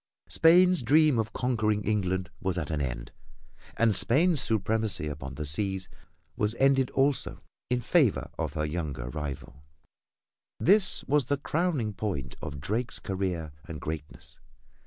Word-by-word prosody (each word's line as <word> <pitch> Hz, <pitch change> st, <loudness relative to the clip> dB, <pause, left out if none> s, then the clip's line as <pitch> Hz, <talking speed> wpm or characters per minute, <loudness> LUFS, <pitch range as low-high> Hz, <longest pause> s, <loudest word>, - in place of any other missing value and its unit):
Spain's 180 Hz, +1 st, +5 dB
dream 145 Hz, +1 st, +4 dB
of 110 Hz, -1 st, -1 dB
conquering 110 Hz, -4 st, 0 dB
England 95 Hz, -4 st, -1 dB
was 95 Hz, -2 st, -2 dB
at 80 Hz, -3 st, -3 dB
an 75 Hz, -2 st, -1 dB
end -, -, -4 dB, 0.7 s
and 115 Hz, -2 st, +3 dB
Spain's 135 Hz, -, +3 dB
supremacy 110 Hz, -, 0 dB
upon 70 Hz, -2 st, -6 dB
the 75 Hz, -, -4 dB
seas 95 Hz, +5 st, -1 dB, 0.5 s
was 105 Hz, +2 st, 0 dB
ended 135 Hz, -1 st, +3 dB
also 135 Hz, 0 st, 0 dB, 0.3 s
in 125 Hz, 0 st, +1 dB
favor 135 Hz, -, +2 dB
of -, -, -2 dB
her 75 Hz, 0 st, -1 dB
younger 75 Hz, -6 st, -4 dB
rival. 70 Hz, -2 st, -6 dB, 1.0 s
This 195 Hz, +2 st, +3 dB
was 145 Hz, -1 st, +2 dB
the 145 Hz, +3 st, 0 dB
crowning 145 Hz, -7 st, -1 dB
point 90 Hz, -12 st, -4 dB
of 70 Hz, -1 st, -6 dB
Drake's 110 Hz, -, -2 dB
career 95 Hz, -6 st, -3 dB, 0.2 s
and 80 Hz, -3 st, -6 dB
greatness. 75 Hz, +1 st, -7 dB
105 Hz, 135 wpm, -28 LUFS, -, 1.0 s, Spain's